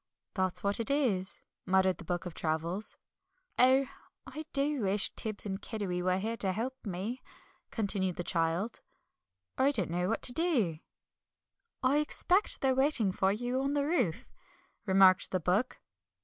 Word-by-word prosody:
"That's 185 -2 -2
what 200 +2 +1
it 230 - +2
is," 230 -10 -1 0.2
muttered 190 0 +2
the - - -8
Book 175 +1 -3
of 175 - -6
Travels. 165 +6 -1 0.6
"Oh, 260 +2 +5 0.4
I 300 +4 -8
do 280 -1 +1
wish 200 0 +1
Tibbs 215 -2 -2
and 195 0 -4
Kiddiwee 200 -6 -4
were 185 +1 +1
here 225 +4 -3
to 190 -3 -1
help 235 +6 -3
me," 205 +6 -5 0.5
continued 195 -4 0
the 175 - -4
child; 170 +6 -1 0.8
"I 270 - +4
don't 195 - -3
know 180 +2 -1
what 225 - -2
to 245 - +6
do." 245 - 0 1.0
"I 265 +3 +3
expect 355 +6 +3
they're 265 -1 +2
waiting 265 -6 +3
for 190 +1 +1
you 245 +5 -2
on 275 +1 -1
the 285 -1 0
roof," 255 - -1 0.6
remarked 190 -1 +5
the 185 - -1
Book. 190 +9 -1
205 Hz, 155 wpm, -30 LUFS, 185-260 Hz, 1.0 s, to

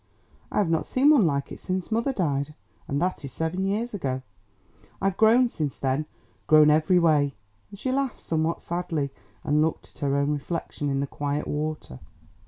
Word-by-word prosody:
"I - - -3
have 200 -5 +2
not 165 - 0
seen 275 +4 +4
one 245 - +5
like 140 -2 -1
it - - -8
since 185 0 -3
mother 235 +5 +1
died, 150 - -1 0.3
and 140 -1 -1
that 180 -1 -1
is 140 - -6
seven 170 +7 -2
years 220 +4 -1
ago. 130 -9 -2 0.8
I've 195 -1 0
grown 230 +4 +5
since 155 - -3
then, 135 +3 -1 0.4
grown 155 -1 +7
every 155 +4 +4
way," 150 -5 +3 0.3
and 200 - -11
she 255 +6 -2
laughed 270 -1 -1
somewhat 160 0 -1
sadly, 165 -5 -2 0.3
and 150 +1 +2
looked 160 0 -1
at - - -17
her 140 -1 +1
own 140 +1 +1
reflection 150 0 -3
in 135 0 0
the - - 0
quiet 145 +1 -3
water. 150 - -4
160 Hz, 185 wpm, -26 LUFS, 145-195 Hz, 0.8 s, grown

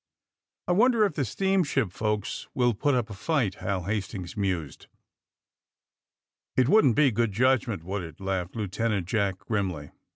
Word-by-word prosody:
^^I 180 - +2
wonder 230 +1 +4
if 200 - -1
the 150 - -2
steamshi|) 145 - +1
folks 105 0 -2
will 120 -1 +3
put 145 +6 +1
up 115 -3 -1
a - - -5
fight?" 120 - 0
Hal 95 -2 -1
Hastings 100 -1 -4
mused. 90 - -3 1.7
It 130 -1 +4
wouldn't 145 - +5
be 145 -3 +4
good 115 -1 0
judgment, 115 -5 +1
would 95 +3 -3
itf" - - -35
laughed 95 -1 -3
Lieutenant 105 -2 -1
Jack 100 -1 0
grimly. 95 -9 -3
110 Hz, 150 wpm, -27 LUFS, 95-130 Hz, 1.7 s, wouldn't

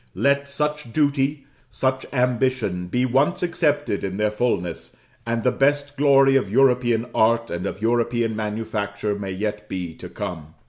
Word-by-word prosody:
Let 140 0 +1
such 150 -2 -2
duty, 140 0 +1 0.2
such 130 0 -1
ambition, 125 -7 0
be 125 +7 +1
once 135 +8 +1
accepted 150 - 0
in 95 -1 -3
their 105 0 +1
fulness, 100 -7 -2 0.3
and 115 -1 -1
the 125 - +3
best 145 +2 +1
glory 135 -1 +5
of 135 -7 +2
European 120 -1 +3
art 115 +1 +2
and 85 +1 -3
of 100 - -6
European 115 -1 +1
manufacture 105 -1 -3
may 100 -1 -5
yet 105 +2 -4
be 90 -3 -4
to - - -9
come. 80 -3 -6
120 Hz, 150 wpm, -23 LUFS, 105-135 Hz, 0.3 s, glory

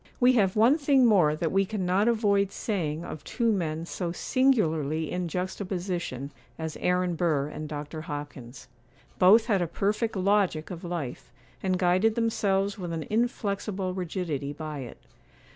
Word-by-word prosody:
We 250 +1 +5
have 195 -6 +2
one 240 +8 +5
thing 275 -3 +4
more 180 -10 +4
that 160 +1 -1
we 195 0 +3
cannot 195 0 0
avoid 200 -4 +2
saying 170 -8 -2
of 155 -3 -7
two 235 -2 0
men 165 -5 -2
so 170 0 -3
singularly 160 - +1
in 180 -1 -2
juxtaposition, 180 -5 -3 0.3
as 160 -1 -4
Aaron 180 0 +1
Burr 155 -4 0
and 155 0 -6
Dr. 150 +1 -6
Hopkins. 145 -5 -8 0.5
Both 210 +5 +7
had 205 -6 +1
a 175 - 0
perfect 210 +6 -1
logic 190 -5 +1
of 175 0 -7
life, 170 -9 -5 0.3
and 185 -1 0
guided 185 +5 +2
themselves 205 -3 0
with 175 -2 -4
an 160 -1 -3
inflexible 205 -4 -1
rigidity 165 -6 -3
by 155 -1 -6
it. 125 -3 -8
180 Hz, 150 wpm, -27 LUFS, 155-205 Hz, 0.5 s, Both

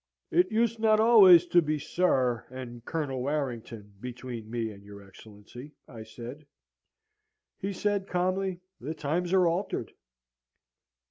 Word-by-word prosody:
"'It 355 -6 +3
used 230 +1 +1
not 215 -1 +4
always 200 -7 +8
to 175 0 +4
be 155 -1 -1
Sir 130 -7 0
and 120 -2 -9
Colonel 145 -6 -3
Warrington, 120 -7 -4
between 120 -2 -7
me 115 -1 -3
and 100 -1 -14
your 100 -1 -13
Excellency,' 110 +8 -13
I 115 -3 -10
said. 120 +6 -10 1.1
"He 195 - -3
said, 200 0 -1
calmly, 185 0 -1 0.2
'The 150 +6 -5
times 165 +4 -2
are 190 -1 +4
altered.' 175 +4 -2
145 Hz, 130 wpm, -28 LUFS, 120-185 Hz, 1.1 s, always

